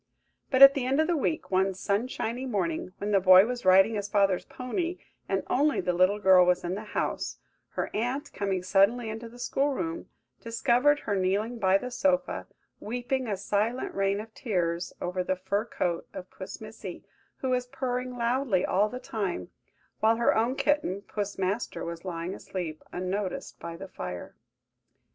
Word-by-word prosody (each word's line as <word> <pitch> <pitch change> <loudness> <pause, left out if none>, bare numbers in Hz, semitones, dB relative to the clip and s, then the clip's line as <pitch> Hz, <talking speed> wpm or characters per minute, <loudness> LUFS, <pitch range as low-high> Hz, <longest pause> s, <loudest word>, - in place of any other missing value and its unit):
But 270 0 +7
at 275 0 +11
the 275 - -2
end 270 +3 +2
of 315 - +4
the 345 +1 +1
week, 315 -3 -1
one 190 0 +2
sunshiny 230 +5 -2
morning, 185 -6 -2
when 205 +1 -3
the 200 - +5
boy 185 +1 +8
was 245 -2 -4
riding 190 +4 +6
his 205 -1 -3
father's 195 -3 +2
pony, 335 +8 -3 0.3
and - - 0
only 290 +3 +2
the 180 0 0
little 185 +3 +3
girl 190 -3 +6
was 180 0 +2
in 175 +1 -2
the 205 +3 -4
house, - - -2 0.4
her - - -2
aunt, 245 +6 -2
coming 195 -3 -1
suddenly 205 +5 +3
into 225 +1 -7
the 240 - -14
school 275 +3 0
room, 335 +2 -4 0.3
discovered 245 +5 +2
her 205 - -1
kneeling 200 +5 0
by 190 -1 +4
the 250 +5 -6
sofa, 275 +1 0 0.3
weeping 245 +3 -2
a 205 -3 -1
silent 210 +5 -1
rain 195 0 +1
of 220 +1 -9
tears 175 -9 -1
over 180 +1 -2
the 185 - 0
fur 195 +4 -1
coat 175 -7 -2
of 180 - -8
Puss - - -8
Missy, - - -8 0.3
who 260 - -3
was 250 0 0
purring 250 -1 -3
loudly 235 -5 +1
all 205 +3 +2
the 250 - -6
time; 205 - -4 0.5
while 220 +1 +4
her 235 +1 +2
own 230 +4 +1
kitten, 275 -11 0
Puss 205 -1 -4
Master, 195 +5 -2
was 170 0 -6
lying 175 0 -4
asleep 170 -6 -5
unnoticed 185 +1 -3
by 165 0 -7
the 195 +2 -8
fire. 90 - -7
210 Hz, 175 wpm, -28 LUFS, 185-250 Hz, 0.5 s, at